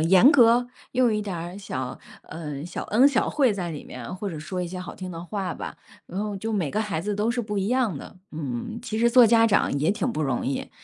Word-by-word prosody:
严 185 - +7
格， 240 -1 +5 0.3
用 250 -3 +3
一 210 - 0
点 200 -4 -4
儿 175 +3 -6
小 130 -10 -5 0.2
呃， 150 -3 -6
小 175 - -5
恩 245 +6 +5
小 260 -5 +1
惠 265 -6 +3
在 180 -4 -3
里 150 - -6
面， 125 +4 -7
或 200 +1 -4
者 160 - -6
说 180 +4 -4
一 - - -3
些 185 +1 -6
好 180 - -7
听 185 -1 -7
的 165 0 -7
话 195 0 -3
吧， - - -7 0.3
然 185 - -6
后 205 -2 -3
就 220 +3 -3
每 180 -9 0
个 215 - 0
孩 210 -7 -2
子 205 +4 -2
都 210 +2 0
是 240 +1 -1
不 210 -2 -3
一 195 - 0
样 245 - +1
的。 - - -11
嗯， 150 - -4
其 220 -2 -4
实 235 +1 +4
做 245 -1 +8
家 230 0 +5
长 200 -7 +2
也 155 - +3
挺 205 -1 -1
不 155 - -2
容 135 -4 -1
易， 135 - -3
195 Hz, 270 characters per minute, -25 LUFS, 165-225 Hz, 0.3 s, 做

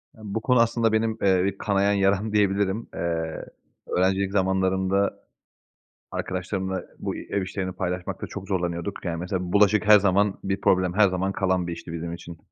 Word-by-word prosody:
Ya 110 - -16
bu 105 +2 -3
konu 125 0 +3
aslında 115 -1 +2
benim, 110 0 +1
ııı, 95 -2 +4
bir 100 0 -2
kanayan 100 0 +1
yaram 100 +2 +1
diyebilirim. 100 +1 +1
Iıı, 80 -1 -3 0.4
öğrencilik 95 +1 +1
zamanlarında 95 0 +1 0.9
arkadaşlarımla 95 0 -3 0.2
bu - - -3
ev 100 - -3
işlerini 95 0 -4
paylaşmakta 90 -1 -4
çok 95 - -8
zorlanıyorduk. 90 0 -3
Yani, 85 -2 -2
mesela, 90 0 -3
bulaşık 105 +1 +4
her 105 -1 +9
zaman 100 +1 +2
bir 95 0 -2
problem, 90 -1 +2
her 100 0 +5
zaman 95 +1 -1
kalan 95 -2 0
bir 85 - -3
işti 85 - -8
bizim 85 0 -4
için. 85 -1 -9
95 Hz, 165 wpm, -25 LUFS, 90-100 Hz, 0.9 s, her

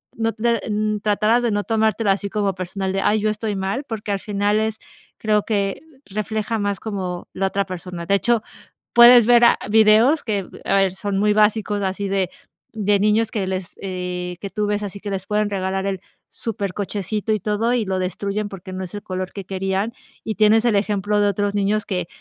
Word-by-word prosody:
no, 225 0 0
eh, 235 -2 +1
mm, 215 0 0
tratarás 215 +3 +2
de 240 - +2
no 205 0 0
tomártelo 220 -1 +1
así 200 +1 -1
como 200 -1 0
personal 190 +1 -3
de: 195 - 0
"Ay, 215 +1 +2
yo 215 - +1
estoy 215 -1 -3
mal", 195 +8 -2
porque, 215 -4 -5
al 200 - -1
final 205 0 0
es 220 0 -1 0.4
creo 210 -1 +2
que 200 0 -1 0.3
refleja 215 +2 -2
más 205 -1 -1
como 185 -5 -4
la 195 +1 0
otra 200 +1 -1
persona, 180 -2 -6
de 200 - +4
hecho, 230 +2 +1 0.5
puedes 240 -1 +9
ver 240 0 +6
a - - +5
videos 220 +7 +5
que, 205 -5 -2 0.2
a 195 - +2
ver 195 -2 +3
son 200 0 -2
muy 210 +1 +3
básicos 210 -1 +2
así 195 +1 -2
de 195 -2 0 0.4
de 205 -2 +1
niños 215 +2 +2
que 200 -4 -2
les, 185 -2 -4
eh, 180 -2 -4
que 200 - -5
tú 210 +1 -2
ves, 205 0 0
así 200 0 -6
que 210 - -5
les 190 -1 -3
pueden 210 0 +1
regalar 190 -1 -2
el 195 -1 -2 0.3
súper 205 -4 -4
cochecito 205 +2 -2
y 215 - 0
todo, 215 +4 0
y 245 -2 +1
lo 190 -1 -1
destruyen 200 +3 -2
porque, 190 -2 -9
no 185 0 -4
es 175 - -11
el 205 - -6
color 185 0 -4
que 200 - -6
querían, 195 +3 -1 0.3
y 220 - -3
tienes 215 +1 +4
el 235 -3 +3
ejemplo 205 0 0
de 205 - +3
otros 200 +1 -1
niños 205 +1 +1
que 180 -3 -2
205 Hz, 210 wpm, -21 LUFS, 195-215 Hz, 0.5 s, puedes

